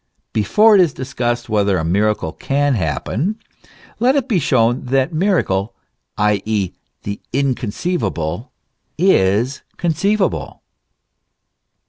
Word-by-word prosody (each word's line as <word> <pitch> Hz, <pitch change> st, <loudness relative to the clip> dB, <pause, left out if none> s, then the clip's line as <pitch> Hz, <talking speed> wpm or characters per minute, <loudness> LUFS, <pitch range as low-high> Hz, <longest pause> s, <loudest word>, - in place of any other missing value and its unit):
Before 210 Hz, -, +4 dB
it 200 Hz, -, +7 dB
is 165 Hz, -6 st, +1 dB
discussed 120 Hz, -2 st, -2 dB
whether 100 Hz, -3 st, +1 dB
a 80 Hz, -, -1 dB
miracle 100 Hz, -1 st, +1 dB
can 140 Hz, -, 0 dB
happen, 110 Hz, -, -1 dB, 0.6 s
let 255 Hz, +4 st, +3 dB
it 275 Hz, -3 st, 0 dB
be 215 Hz, -9 st, +2 dB
shown 120 Hz, -3 st, +1 dB
that 135 Hz, +5 st, +1 dB
miracle, 155 Hz, -, 0 dB, 0.4 s
i.e., 105 Hz, -2 st, 0 dB, 0.3 s
the 100 Hz, 0 st, -5 dB
inconceivable, 125 Hz, -, -2 dB, 0.5 s
is 125 Hz, -, +2 dB, 0.2 s
conceivable. 190 Hz, +5 st, -1 dB
125 Hz, 100 wpm, -18 LUFS, 100-170 Hz, 0.6 s, it